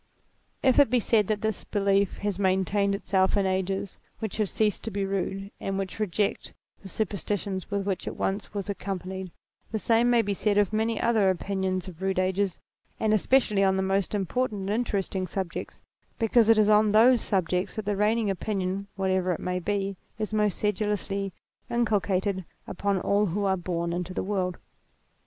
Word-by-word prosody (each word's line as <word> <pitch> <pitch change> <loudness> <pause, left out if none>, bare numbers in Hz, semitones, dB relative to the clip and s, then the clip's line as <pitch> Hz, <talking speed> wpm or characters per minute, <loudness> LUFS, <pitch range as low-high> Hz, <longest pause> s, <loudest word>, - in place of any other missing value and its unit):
If 260 +1 +5
it 285 - +6
be 250 +1 +3
said 215 -2 +2
that 215 -1 -1
this 220 -2 -1
belief 200 -1 +1
has 205 -2 -2
maintained 195 +1 +2
itself 190 0 +1
in 200 - +2
ages 190 +1 -2 0.2
which 220 -3 -4
have 210 -3 0
ceased 210 -2 +1
to - - -1
be 200 -2 -2
rude 195 +1 -3
and 195 0 -2
which 195 +1 -4
reject 205 0 -1 0.3
the 195 - -10
superstitions 200 -2 -3
with 200 -1 -1
which 195 -3 -2
it - - -4
once 195 +2 -2
was 200 -2 -4
ac 200 - -4
companied, 190 -1 -4 0.4
the 220 - 0
same 230 +2 +3
may 240 -1 +4
be 200 -1 -1
said 205 +1 +1
of 205 0 +2
many 220 0 0
other 220 -4 +3
opinions 190 0 -1
of 180 -1 -10
rude 190 -1 0
ages, 185 0 +1 0.4
and 215 -1 +2
especially 215 -2 +3
on 190 0 +3
the 190 - +1
most 195 +1 0
important 210 +2 -1
and 190 - -4
interesting 200 -4 -1
subjects, 185 0 -5 0.3
because 225 0 +3
it 225 - +7
is 215 -1 +5
on 210 0 +5
those 235 +3 +6
subjects 185 -2 0
that 215 - -4
the 205 0 0
reigning 210 +1 +2
opinion, 195 0 -2
whatever 190 -1 +1
it 170 - -2
may 180 0 -2
be, 195 +1 -1 0.2
is 215 -1 -3
the 215 - 0
most 210 -3 +1
sedulously 205 -1 -1 0.4
inculcated 200 -4 0 0.2
upon 200 +1 -1
all 205 +1 +2
who 200 +4 -1
are 190 -1 +3
born 170 -1 -2
into 180 +1 -4
the - - -1
world. 185 -3 -1
200 Hz, 185 wpm, -27 LUFS, 190-210 Hz, 0.4 s, it